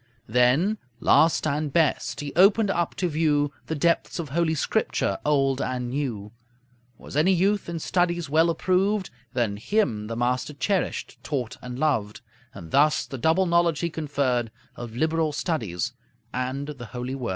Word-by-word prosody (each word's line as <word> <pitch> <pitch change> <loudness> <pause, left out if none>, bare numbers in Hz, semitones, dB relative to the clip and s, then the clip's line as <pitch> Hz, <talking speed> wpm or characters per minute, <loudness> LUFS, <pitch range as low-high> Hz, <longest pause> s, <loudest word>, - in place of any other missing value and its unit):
Then, 125 - +2 0.2
last 160 0 +4
and 150 0 -1
best, 155 -1 +1
he 145 -1 -5
opened 200 +3 +5
up 170 -3 -1
to 180 - 0
view 150 -3 +1
The 160 - -2
depths 170 +3 +1
of 165 -5 -4
Holy 160 +2 +1
Scripture, 100 -8 0
Old 135 -2 +2
and 125 -1 -2
New. 120 -7 -3 0.7
Was - - -11
any 160 +6 +4
youth 195 +2 +1
in 170 - -3
studies 175 0 0
well 160 +4 +3
approved, 190 +3 +1 0.2
Then 115 -5 0
him 110 - 0
the 115 - -4
master 125 +4 -1
cherished, 195 +6 -2
taught, 125 -6 -3
and 125 0 -7
loved; 130 -9 0 0.3
And 80 - -10
thus 150 +2 +3
the 135 - -7
double 165 +7 +3
knowledge 170 -2 +2
he 170 -1 -1
conferred 140 -6 -1 0.3
Of 120 -2 -8
liberal 160 +2 +1
studies 125 - -2 0.4
and 130 +2 -2
the 130 -5 -7
Holy 125 +2 -3
Word. 130 -3 -4
150 Hz, 160 wpm, -25 LUFS, 125-170 Hz, 0.7 s, opened